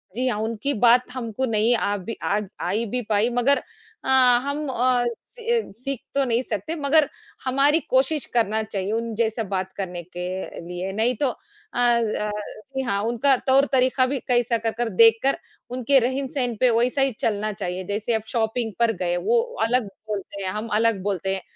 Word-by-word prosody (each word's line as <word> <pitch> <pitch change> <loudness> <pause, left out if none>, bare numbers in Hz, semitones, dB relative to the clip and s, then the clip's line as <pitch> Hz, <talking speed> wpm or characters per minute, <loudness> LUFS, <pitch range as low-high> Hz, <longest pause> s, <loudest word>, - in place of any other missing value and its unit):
जी 255 +2 0
हाँ, 240 -4 0
उनकी 225 +5 -1
बात 245 +2 +4
हमको 250 0 -3
नहीं 225 0 +3
आ 205 -3 0
भी 205 +4 -6
आ 205 - +1 0.3
आई 210 +6 0
भी 245 +3 -2
पाई 215 +2 +3
मगर 280 +4 +4 0.5
अ, - - -3 0.3
हम 285 +2 -3
अ, 250 -1 +2 0.3
सी 470 -1 -4
अ, - - -7
सीख 255 +4 -4 0.2
तो 280 - +3
नहीं 235 -1 +1
सकते 220 - -4
मगर 295 0 +3 0.4
हमारी 275 +4 +3
कोशिश 265 +2 +2
करना 220 -2 +2
चाहिए 200 -2 -3
उन 230 +1 -2
जैसे 225 0 0
बात 190 0 -2
करने 180 -3 -5
के 180 +1 -7 0.4
लिए। 180 +2 -4
नहीं 225 +4 +1
तो 280 - +3
अ - - -5 0.4
अ, 235 -3 +2 0.4
जी 265 - 0
हाँ, 200 -5 -1
उनका 240 +4 +3
तौर-तरीका 260 -1 +3
भी 270 +1 -2
कैसा 240 -1 +2
कर 225 0 -1
कर 240 -1 0
देखकर 225 +6 +4 0.3
उनके 255 +2 +3
रहन-सहन 260 0 -1
पे 255 - +5
वैसा 250 +3 +1
ही 270 0 +3
चलना 215 -1 0
चाहिए। 185 -2 -4
जैसे 210 +3 -1
अब 220 - +1
शॉपिंग 225 -1 -1
पर 235 -1 +4
गए, 175 -1 0
वो 465 - +2 0.2
अलग 235 -1 +1 0.2
बोलते 200 -1 -5
हैं, 190 - -1
हम 215 +3 -4
अलग 225 -1 +2
बोलते 195 -1 -1
हैं, 190 - -5
235 Hz, 185 wpm, -24 LUFS, 210-260 Hz, 0.5 s, पे